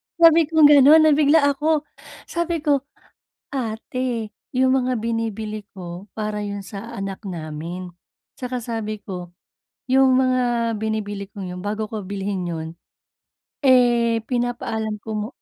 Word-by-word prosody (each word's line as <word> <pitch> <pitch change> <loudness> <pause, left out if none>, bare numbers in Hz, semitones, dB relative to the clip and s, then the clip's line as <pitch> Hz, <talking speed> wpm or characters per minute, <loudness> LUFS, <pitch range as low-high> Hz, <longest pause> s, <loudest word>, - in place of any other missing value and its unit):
sabi 330 -1 +6
kong 315 -2 +6
ganon, 295 +3 +8
nabigla 300 0 +5
ako. 305 +2 +1 0.4
Sabi 340 -2 -2
ko, 285 -2 +3 0.7
"Ate, 235 -2 -3 0.2
'yung 260 0 +3
mga 255 0 0
binibili 220 -2 -3
ko, 180 +1 -8
para 215 -1 -3
'yon 205 -1 -4
sa 215 +4 -8
anak 195 -2 -5
namin." 170 +1 -6 0.5
Saka 250 -1 -3
sabi 215 -2 -4
ko, 180 -3 -7 0.5
'Yung 265 0 +4
mga 245 -3 +2
binibili 205 -2 -3
kong 200 -2 -8
'yon, 180 - -7
bago 210 +2 -2
ko 215 0 -5
bilhin 195 -2 -3
'yon, 160 -1 -4 0.9
eh 240 -4 +4
pinapaalam 230 -3 -2
ko 220 +1 -7
mo 210 0 -2
225 Hz, 130 wpm, -22 LUFS, 205-260 Hz, 0.9 s, ganon